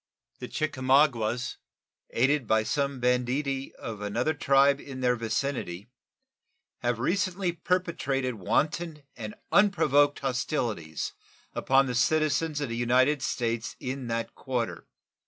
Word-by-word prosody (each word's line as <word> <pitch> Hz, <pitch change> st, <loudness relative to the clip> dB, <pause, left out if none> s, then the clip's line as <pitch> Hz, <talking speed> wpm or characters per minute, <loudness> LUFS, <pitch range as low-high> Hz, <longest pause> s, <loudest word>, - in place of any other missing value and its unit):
The -, -, -6 dB
Chickamaugas, 130 Hz, -5 st, +1 dB, 0.5 s
aided 135 Hz, +1 st, +2 dB
by 110 Hz, +1 st, +3 dB
some 140 Hz, +2 st, -1 dB
banditti 125 Hz, +3 st, 0 dB
of 110 Hz, -3 st, -7 dB
another 115 Hz, +9 st, 0 dB
tribe 140 Hz, -1 st, +4 dB
in 130 Hz, -2 st, -8 dB
their 125 Hz, -1 st, +3 dB
vicinity, 115 Hz, -3 st, -3 dB, 0.9 s
have 120 Hz, -1 st, 0 dB
recently 185 Hz, -, 0 dB
perpetrated 170 Hz, -7 st, -1 dB
wanton 150 Hz, -, -1 dB
and 110 Hz, -3 st, -7 dB, 0.2 s
unprovoked 155 Hz, -8 st, +4 dB
hostilities 120 Hz, -, -2 dB, 0.4 s
upon 135 Hz, +1 st, +3 dB
the 125 Hz, -, -2 dB
citizens 155 Hz, +4 st, +1 dB
of 140 Hz, -, -2 dB
the 115 Hz, -, -3 dB
United 130 Hz, +4 st, +3 dB
States 115 Hz, -4 st, -2 dB
in 130 Hz, 0 st, -4 dB
that 115 Hz, 0 st, -2 dB
quarter. 125 Hz, -4 st, -3 dB
130 Hz, 115 wpm, -28 LUFS, 120-145 Hz, 0.9 s, tribe